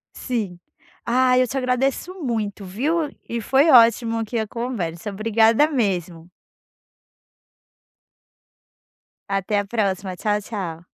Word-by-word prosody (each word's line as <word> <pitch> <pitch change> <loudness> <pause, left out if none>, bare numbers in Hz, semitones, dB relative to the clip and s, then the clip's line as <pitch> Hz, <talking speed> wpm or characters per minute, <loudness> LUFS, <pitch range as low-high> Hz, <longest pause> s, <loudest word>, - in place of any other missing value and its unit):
Sim. 215 -8 -3 0.5
Ah, 250 +1 +3
eu 255 -1 +3
te 270 - -6
agradeço 260 +7 -1
muito, 215 -5 -3
viu? 290 - -1 0.2
E 235 - -2
foi 275 +8 +3
ótimo, 230 -2 +5
aqui, 225 +1 -2
a 220 - -2
conversa. 210 -7 -4
Obrigada 225 +6 +3
mesmo. 180 - -2 3.0
Até 195 +1 -1
a 205 - -2
próxima. 195 -3 -2
Tchau, 210 +3 0
tchau. 175 -6 -6
225 Hz, 110 wpm, -22 LUFS, 195-250 Hz, 3.0 s, ótimo